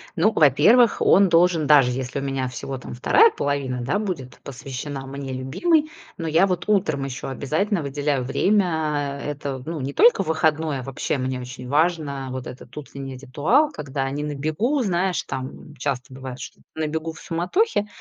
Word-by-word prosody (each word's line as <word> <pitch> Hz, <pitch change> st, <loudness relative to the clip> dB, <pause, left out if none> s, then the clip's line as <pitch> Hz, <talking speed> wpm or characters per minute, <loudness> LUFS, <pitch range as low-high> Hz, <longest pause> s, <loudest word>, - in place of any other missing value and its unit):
Ну, 190 Hz, +6 st, +3 dB
во-первых, 165 Hz, -, +5 dB
он 195 Hz, 0 st, +5 dB
должен, 170 Hz, -2 st, +3 dB
даже 140 Hz, -4 st, +6 dB
если 130 Hz, +2 st, -3 dB
у -, -, -5 dB
меня 135 Hz, -1 st, -2 dB
всего 130 Hz, +2 st, -5 dB
там 125 Hz, -, -8 dB
2 435 Hz, -, +5 dB
половина, 140 Hz, -, -2 dB
да 165 Hz, +12 st, 0 dB
будет 170 Hz, -12 st, -5 dB
посвящена 135 Hz, +1 st, -6 dB
мне 135 Hz, 0 st, -6 dB
любимой, 305 Hz, -, +1 dB, 0.3 s
но 165 Hz, -, -4 dB
я 165 Hz, +5 st, +4 dB
вот 180 Hz, -2 st, -2 dB
утром 180 Hz, -9 st, +1 dB
ещё 130 Hz, -2 st, -6 dB
обязательно 155 Hz, +7 st, -1 dB
выделяю 140 Hz, -1 st, -1 dB
время- 155 Hz, -3 st, 0 dB
это, 140 Hz, -2 st, -4 dB
ну, 165 Hz, -1 st, -3 dB
не 135 Hz, +2 st, -4 dB
только 235 Hz, +1 st, +5 dB
в -, -, -12 dB
выходной,- 155 Hz, -2 st, +1 dB
а -, -, -6 dB
вообще, 135 Hz, +2 st, -2 dB
мне 130 Hz, 0 st, -2 dB
очень 125 Hz, 0 st, -8 dB
важно, 145 Hz, -3 st, 0 dB
вот 130 Hz, -1 st, -5 dB
этот 125 Hz, -1 st, -11 dB
утренний 140 Hz, -2 st, -7 dB
ритуал. 155 Hz, -, +2 dB
Когда 135 Hz, -, -3 dB
не 145 Hz, +2 st, -3 dB
на 150 Hz, 0 st, -3 dB
бегу, 155 Hz, -, 0 dB
знаешь, 185 Hz, -4 st, 0 dB
там 130 Hz, +3 st, -7 dB
часто 135 Hz, -3 st, -3 dB
бывает, 130 Hz, -1 st, -8 dB
что -, -, -9 dB, 0.2 s
на 160 Hz, -1 st, -1 dB
бегу 160 Hz, +2 st, -3 dB
в -, -, -13 dB
суматохе, 205 Hz, -, 0 dB
145 Hz, 175 wpm, -23 LUFS, 135-175 Hz, 0.3 s, даже